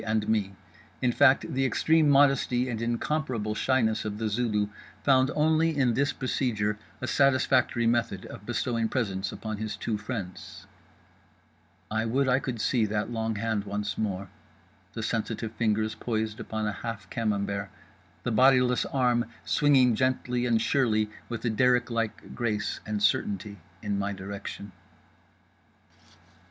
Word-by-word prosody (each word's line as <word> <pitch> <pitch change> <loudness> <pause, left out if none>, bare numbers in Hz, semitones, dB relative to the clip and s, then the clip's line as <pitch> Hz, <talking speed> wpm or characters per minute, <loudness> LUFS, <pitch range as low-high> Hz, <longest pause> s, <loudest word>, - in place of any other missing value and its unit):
and 110 -1 0
me: 100 -3 0 0.4
in 125 - +2
fact 135 +2 +4
the 135 +1 +1
extreme 155 +3 +3
modesty 135 -3 +4
and 115 -3 -3
incomparable 120 -2 -1
shyness 110 -2 +1
of 105 -1 -4
The 110 0 -1
Zulu 105 -2 0 0.4
found 130 -1 +4
only 160 +1 +2
in 125 -4 +3
this 140 +3 +1
procedure 105 -5 -1 0.2
a - - -2
satisfactory 130 -3 +2
method 115 -5 0
of - - -10
bestowing 115 0 -1
presents 95 -6 -2
upon 110 -1 -5
his 110 0 -4
two 110 -2 -2
friends… 100 -4 -6 1.3
I 110 +1 0
would 130 +4 +1
I 130 +1 +3
could 125 -4 -4
see 115 +1 +2
that 105 +2 -2
long 110 -1 -2
hand 105 -1 -1
once 105 0 -3
more, 100 -3 -3 0.6
the - - -4
sensitive 110 - -2
fingers 110 -1 0
poised 110 -2 -3
upon 110 -1 -3
a 105 - 0
half 105 -5 -5
camembert; 100 -3 -1 0.5
the 120 - -1
bodiless 125 +1 +4
arm 125 -3 +1 0.2
swinging 135 -4 +4
gently 125 0 0
and 115 -2 +3
surely 110 -4 +1 0.2
with 120 0 -5
a 115 - +2
derrick 125 +2 +2
like 115 -2 -3
grace 105 -3 -2
and 105 -1 -2
certainty 100 -1 0 0.2
in 100 -2 -1
my 100 0 -1
direction…. 100 +1 -7
115 Hz, 145 wpm, -28 LUFS, 105-125 Hz, 1.3 s, fact